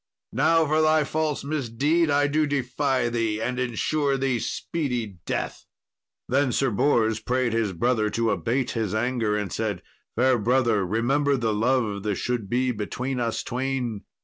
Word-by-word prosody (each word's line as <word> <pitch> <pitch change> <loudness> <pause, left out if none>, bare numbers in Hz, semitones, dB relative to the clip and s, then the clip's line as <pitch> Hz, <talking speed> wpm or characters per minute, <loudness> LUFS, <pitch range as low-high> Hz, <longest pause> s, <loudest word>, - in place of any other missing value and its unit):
Now, 165 0 +3
for 155 +1 +2
thy 155 0 +4
false 155 -1 -1
misdeed, 145 +3 0
I 145 0 +3
do 150 +1 +1
defy 135 -1 0
thee, 115 -2 -1
and 125 +3 -2
ensure 135 +4 0
thee 130 -3 0
speedy 120 - -3
death." - - -3 0.6
Then 135 0 +2
Sir 135 +1 +1
Bors 110 -2 +2
prayed 125 0 0
his 115 -3 0
brother 110 +3 +1
to 115 +1 0
abate 115 +8 -1
his 110 -3 -2
anger, 115 -2 0
and 105 -2 -3
said, 105 -5 -2 0.3
"Fair 125 +1 +3
brother, 115 -2 +2
remember 135 +7 +1
the 115 -3 0
love 110 -2 +1
that 105 0 -1
should 115 -1 -2
be 125 +2 +1
between 125 +4 -3
us 115 -2 -1
twain." 125 -4 -2
125 Hz, 155 wpm, -25 LUFS, 110-140 Hz, 0.6 s, thy